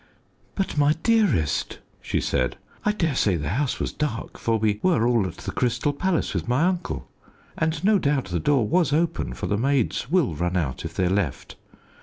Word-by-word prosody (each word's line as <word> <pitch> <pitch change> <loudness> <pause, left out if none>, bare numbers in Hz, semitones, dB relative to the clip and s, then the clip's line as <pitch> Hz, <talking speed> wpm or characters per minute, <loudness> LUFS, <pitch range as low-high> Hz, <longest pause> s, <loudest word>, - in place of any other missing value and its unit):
"But, 195 -6 -1
my 145 +1 +5
dearest," 205 - +2 0.2
she - - -1
said, 65 - 0 0.3
"I 210 - +3
dare 165 -8 0
say 105 -7 +2
the 75 -3 -3
house 130 - -1
was - - -2
dark, 145 -7 -4
for 115 -1 +1
we 105 -1 0
were 145 -12 +3
all 120 -5 +2
at 85 - -8
the - - -5
Crystal 125 +4 0
Palace 180 +3 0
with - - -3
my 125 +6 +2
uncle, 180 -1 -1 0.5
and 160 0 -1
no 205 0 +4
doubt 140 -4 +1
the 85 -1 -1
door 135 - +2
was 170 +1 +2
open, 155 - 0
for 65 - -4
the 105 - 0
maids 135 -1 0
will 170 - +2
run 90 +4 -1
out 70 -7 -2
if - - -6
they're 95 - +1
left. 90 -7 -2
130 Hz, 195 wpm, -24 LUFS, 100-165 Hz, 0.5 s, my